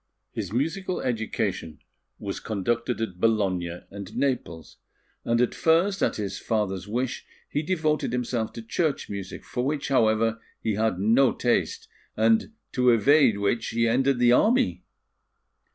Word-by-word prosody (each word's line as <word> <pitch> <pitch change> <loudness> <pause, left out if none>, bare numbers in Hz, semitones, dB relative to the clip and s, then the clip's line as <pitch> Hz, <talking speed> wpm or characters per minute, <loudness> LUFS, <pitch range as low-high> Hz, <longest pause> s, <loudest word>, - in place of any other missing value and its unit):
His 100 -4 -5
musical 165 - -1
education 110 -8 -2 0.4
was - - -5
conducted 115 +4 -2
at 95 -5 -4
Bologna 95 -6 0
and 100 0 -8
Naples; 125 - -2 0.5
and 115 0 +1
at 125 - +2
first, 180 +5 +2
at - - +1
his 105 -2 -4
father's 100 -4 -2
wish, 120 +4 -2 0.2
he 145 - -1
devoted 155 -5 0
himself 120 -2 -2
to 115 - -8
church 150 +3 -1
music, 100 -2 -7
for 125 - -3
which, 140 +1 -2
however, 115 -3 +2 0.2
he 110 - -1
had 110 -2 0
no 115 +7 +4
taste, 120 - 0 0.3
and 110 - +3 0.2
to 125 -1 +3
evade 125 0 +5
which 100 +3 0
he 115 0 +1
entered 130 +3 +2
the 120 0 +4
army. 240 - +3
115 Hz, 140 wpm, -26 LUFS, 105-135 Hz, 0.5 s, evade